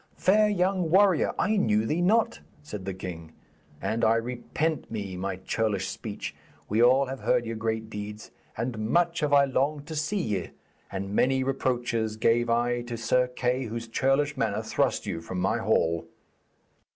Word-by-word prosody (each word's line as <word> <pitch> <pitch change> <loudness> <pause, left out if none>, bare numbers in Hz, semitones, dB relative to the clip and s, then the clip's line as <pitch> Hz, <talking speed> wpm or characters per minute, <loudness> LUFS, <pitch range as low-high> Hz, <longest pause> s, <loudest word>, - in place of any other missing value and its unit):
'Fair 210 +3 +4
young 185 -3 +1
warrior, 190 -2 +4
I 215 +1 +2
knew 110 - +2
ye 155 +9 0
not,' 220 +5 +2 0.2
said 105 -10 -7
the 95 - -3
king, 85 -4 -7 0.5
'and 115 +1 -2
I 115 0 +5
repent 125 +7 -2
me 100 -4 -4
my 95 +1 -3
churlish 100 +1 -1
speech. - - -6 0.3
We 110 +3 +1
all 130 +3 +5
have 135 0 -6
heard 120 - +1
your 115 0 -4
great 110 0 -2
deeds, 105 0 -7 0.3
and 115 0 -3
much 170 +3 +2
have 150 -3 0
I 140 -1 +6
longed 140 +2 0
to 160 - -6
see 155 +7 -1
ye, 100 - -2 0.4
and 100 +1 -4
many 130 +4 +2
reproaches 120 -4 -1
gave 115 +2 +2
I 120 +1 +1
to 120 -1 -6
Sir 125 +2 +2
Kay, 125 +1 -1
whose 115 +1 -5
churlish 135 +5 +1
manner 110 -5 -1
thrust - - 0
you 85 - -3
from 90 +2 -5
my 95 +6 +1
hall.' 85 -7 +1
120 Hz, 170 wpm, -27 LUFS, 110-145 Hz, 0.5 s, I